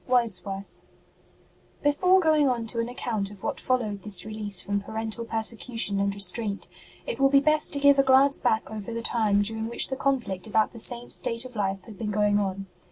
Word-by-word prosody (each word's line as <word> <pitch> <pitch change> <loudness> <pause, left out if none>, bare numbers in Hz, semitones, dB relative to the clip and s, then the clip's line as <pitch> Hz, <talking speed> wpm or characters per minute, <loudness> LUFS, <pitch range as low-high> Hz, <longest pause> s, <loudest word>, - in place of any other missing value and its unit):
WORDSWORTH. 200 -5 -2 1.1
jjEFORE 365 +6 +3
going 305 -3 +3
on 235 -2 -2
to 230 +1 -4
an 230 +1 -2
account 220 -5 -3
of 205 -2 -14
what - - -3
followed 220 -6 -2
this 210 -1 +2
release 210 -3 -1
from 200 +1 -2
parental 220 +2 -3
per 225 -1 -3
secution 225 -3 +1
and 200 0 -1
restraint, 200 +1 0 0.4
it - - -5
will 275 0 +4
be 275 0 +5
best 305 +1 +2
to 285 - 0
give 280 0 +5
a - - +5
glance 270 +1 +4
back 220 -4 -1
over 215 0 -7
the 230 - -4
time 210 -4 +1
during 220 +1 -3
which 235 - +2
the 265 - -3
conflict 240 -9 -2
about 215 0 +1
the 230 - -11
Saint 240 +1 +4
s - - -1
state 230 +1 -2
of 250 -1 -11
life 195 -2 -2
had 220 -4 -13
been 220 -2 -3
going 205 0 +1
on. 195 -1 -3
225 Hz, 210 wpm, -25 LUFS, 205-255 Hz, 1.1 s, be